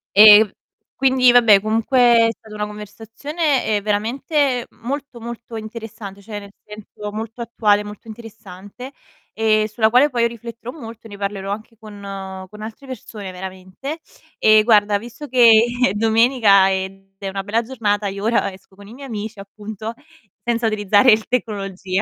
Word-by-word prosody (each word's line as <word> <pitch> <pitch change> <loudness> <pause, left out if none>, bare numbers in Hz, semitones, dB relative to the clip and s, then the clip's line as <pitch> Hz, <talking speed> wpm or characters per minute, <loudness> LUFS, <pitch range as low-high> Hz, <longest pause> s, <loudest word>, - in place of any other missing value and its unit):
E, 210 +1 +10
mhmm, 210 - -11 0.4
quindi 260 -2 +4
vabbè 230 -5 +6
comunque 225 +4 0 0.3
è - - +1
stata 215 -1 -15
una 210 0 -3
conversazione, 225 - -3
ehm, 210 -1 0
veramente 250 +5 -1
molto, 270 +1 -6
molto 235 0 -9
interessante, 220 -2 -8
cioè 210 0 -7
nel 200 -1 -13
senso 210 0 -9
molto 225 +2 -7
attuale, 210 -3 +1
molto 210 +2 -11
interessante, 220 +2 -11 0.4
e 215 -1 +2
sulla 220 0 +2
quale 255 +6 +4
poi 235 -2 +2
rifletterò 235 +1 -9
molto, 225 -3 -10
ne 200 -1 -11
parlerò 200 -1 -4
anche 220 +3 -7
con 210 -2 -12 0.5
con 210 0 -12
altre 225 +6 -9
persone 210 -6 -8
veramente. 190 - -8 0.4
E 215 0 +5
guarda, 210 -2 +4
visto 240 +6 -10
che 245 -2 +5 0.4
è 190 - -3
domenica 220 -3 +4
ed 195 +1 -5
è 195 0 -5
una 195 0 -4
bella 220 +4 0
giornata, 210 -4 -1
io 200 +1 -5
ora 220 -3 +1
esco 190 0 -18
con 200 0 -14
i 225 - -12
miei 275 +1 -10
amici, 215 -1 -6
appunto, 210 +2 -8 0.5
senza 235 -1 0
utilizzare 210 +2 +4
il 215 0 -1
tecnologia. 195 -5 -2
215 Hz, 160 wpm, -20 LUFS, 205-235 Hz, 0.5 s, E